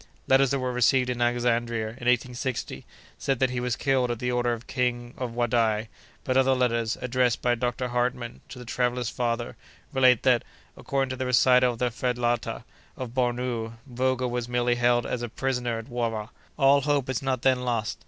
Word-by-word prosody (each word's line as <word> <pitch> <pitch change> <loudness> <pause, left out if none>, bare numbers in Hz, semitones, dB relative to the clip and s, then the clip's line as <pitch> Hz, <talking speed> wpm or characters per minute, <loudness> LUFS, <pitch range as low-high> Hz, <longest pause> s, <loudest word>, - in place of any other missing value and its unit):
Letters 135 0 +5
that 140 - +1
were 130 -1 -2
received 125 +1 +3
in 120 -1 -4
Alexandria, 120 -2 0
in 120 +2 -7
1860, 125 - -1 0.3
said 135 -2 0
that 130 +1 +1
he 125 - -2
was 125 -1 -1
killed 130 -3 +1
at 120 - -1
the 125 +2 -2
order 120 0 +1
of 115 -1 -3
the - - -19
King 120 -2 -1
of 120 -3 -5
Wadai; 115 -2 +1 0.3
but 130 - -1
other 130 0 +4
letters, 115 -2 0
addressed 125 -1 +1
by 125 - +3
Dr. 125 +1 -2
Hartmann 120 0 -2
to - - -9
the 125 - -9
traveller's 125 0 -1
father, 120 -1 -2 0.4
relate 130 -3 +4
that, 125 -3 +4 0.3
according 135 -1 -2
to - - -2
the 130 0 -3
recital 125 0 +4
of 115 - -14
a 125 - +1
felatah 120 -1 -1 0.3
of 130 -2 -5
Bornou, 120 -2 -1
Vogel 130 -1 -1
was 120 -1 -3
merely 120 0 +1
held 120 0 +2
as 125 - -3
a 120 - -4
prisoner 125 0 -2
at 115 - -6
Wara. 115 -3 -3 0.3
All 140 0 +5
hope 145 -1 +1
is 130 -3 -2
not 130 -2 -1
then 130 -1 +3
lost. 120 -3 -2
125 Hz, 195 wpm, -26 LUFS, 120-130 Hz, 0.4 s, Letters